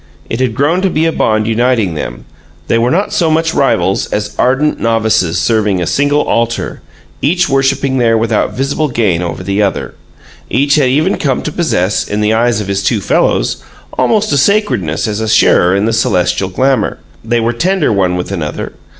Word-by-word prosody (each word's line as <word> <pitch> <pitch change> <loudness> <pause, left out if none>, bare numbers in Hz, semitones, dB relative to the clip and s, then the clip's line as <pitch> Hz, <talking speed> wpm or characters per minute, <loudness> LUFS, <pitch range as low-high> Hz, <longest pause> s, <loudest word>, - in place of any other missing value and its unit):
It 115 - -2
had 125 -4 -1
grown 155 +8 +1
to 190 - +1
be 160 -1 0
a 165 - +2
bond 110 -7 0
uniting 115 -4 +1
them; 65 -6 -6 0.4
they 115 - +2
were 120 +2 +1
not 190 +8 0
so 165 -3 +1
much 165 +1 +1
rivals 100 -8 +1
as 105 0 -3
ardent 135 +4 +1
novices 110 -7 +1
serving 105 -4 +1
a 90 - -1
single 145 - +1
altar, 115 0 -2 0.4
each 180 +5 +1
worshiping 135 0 +1
there 115 -2 +3
without 110 -1 0
visible 140 +3 -1
gain 105 - 0
over 85 -1 -4
the 100 +1 -1
other. 100 -2 -2 0.6
Each 140 +3 +1
had 145 -4 +3
even 155 +9 +1
come 135 -4 -1
to 155 - -3
possess, 110 - 0
in 105 - -2
the 105 +1 +1
eyes 115 -1 +1
of 105 - -4
his 100 0 -1
two 105 +2 0
fellows, 95 - 0 0.4
almost 215 -1 +1
a - - +2
sacredness 130 - +1
as 105 -1 -3
a 110 - -2
sharer 90 -3 +4
in 100 +2 +1
the 115 - 0
celestial 95 -3 0
glamor; 130 +3 0 0.3
they 120 +1 0
were 115 +1 0
tender 170 - 0
one 95 -3 +1
with 90 +2 -4
another. 80 -6 -4
115 Hz, 190 wpm, -13 LUFS, 105-140 Hz, 0.6 s, sharer